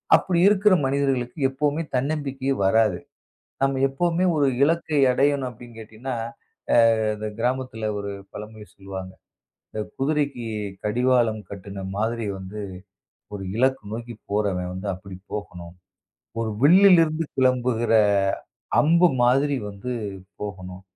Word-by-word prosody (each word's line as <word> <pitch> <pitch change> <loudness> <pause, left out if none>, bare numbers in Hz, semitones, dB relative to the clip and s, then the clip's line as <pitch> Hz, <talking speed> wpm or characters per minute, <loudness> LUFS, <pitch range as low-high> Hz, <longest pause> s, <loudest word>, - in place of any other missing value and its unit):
அப்படி 175 -2 +1
இருக்கிற 205 0 +5
மனிதர்களுக்கு 135 -1 0
எப்போமே 145 +3 -1
தன்னம்பிக்கையே 135 0 -1
வராது. 105 -2 +3 0.6
நம்ம 135 -1 +1
எப்போமே 170 +6 0
ஒரு 145 -2 +3 0.2
இலக்கை 160 -1 +1
அடையணும் 135 0 +1
அப்படின்னு 120 0 -13
கேட்டீங்கன்னா, 110 +4 -6 0.8
அ - - -1
இந்தச் 105 0 -6
கிராமத்தில 125 -3 -1
ஒரு 100 0 -4 0.2
பழமொழி 105 0 -9
சொல்லுவாங்க. 95 -1 -8 0.6
இந்த 110 - -3 0.2
குதிரைக்குக் 120 -9 -2
கடிவாளம் 120 0 +2
கட்டுன 100 -1 -7
மாதிரி 115 +1 -1
வந்து 95 +3 -7 0.7
ஒரு 95 -1 -5
இலக்க 130 +2 +2
நோக்கிப் 115 -1 -8
போறவன் 95 -4 0
வந்து 95 +2 -5
அப்படிப் 95 +1 -12
போகணும். 90 -4 -7 0.7
ஒரு 115 - -1
வில்லிலிருந்து 165 -1 +6
கிளம்புகிற 125 -3 +2 0.9
அம்பு 170 +4 +5
மாதிரி 135 +4 +3
வந்து 100 +5 -6 0.5
போகணும். 95 -2 -7
120 Hz, 110 wpm, -24 LUFS, 105-140 Hz, 0.9 s, வில்லிலிருந்து